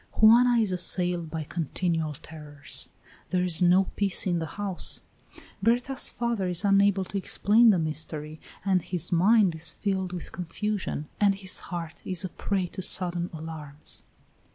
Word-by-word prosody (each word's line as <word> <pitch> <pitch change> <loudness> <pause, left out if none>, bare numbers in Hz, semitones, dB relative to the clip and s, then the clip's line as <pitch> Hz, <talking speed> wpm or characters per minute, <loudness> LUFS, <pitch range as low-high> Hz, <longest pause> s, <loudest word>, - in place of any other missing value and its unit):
Juana 240 +3 +6
is 215 -4 +1
assailed 175 -2 +1
by 160 0 -4
continual 165 0 -2
terrors; 150 -1 -6 0.4
there 180 -1 +1
is 180 -2 +1
no 180 +2 +5
peace 195 -3 +1
in 175 -3 0
the 160 - -4
house. 200 -3 -2 0.6
Berta's 245 +5 +2
father 235 -5 -2
is 180 +2 0
unable 200 -1 +3
to 200 - -4
explain 220 +4 +4
the 200 - +4
mystery, 155 -1 -2 0.2
and 190 -2 +2
his 175 0 -1
mind 190 +2 +4
is 160 0 +2
filled 190 -2 -2
with 180 -2 -6
confusion 185 -3 -4
and 200 -1 +3
his 190 -1 -2
heart 170 -2 -6
is 185 0 -2
a - - -4
prey 195 +1 -2
to 180 - -7
sudden 175 -1 +2
alarms. 155 -2 -7
180 Hz, 155 wpm, -27 LUFS, 165-200 Hz, 0.6 s, Juana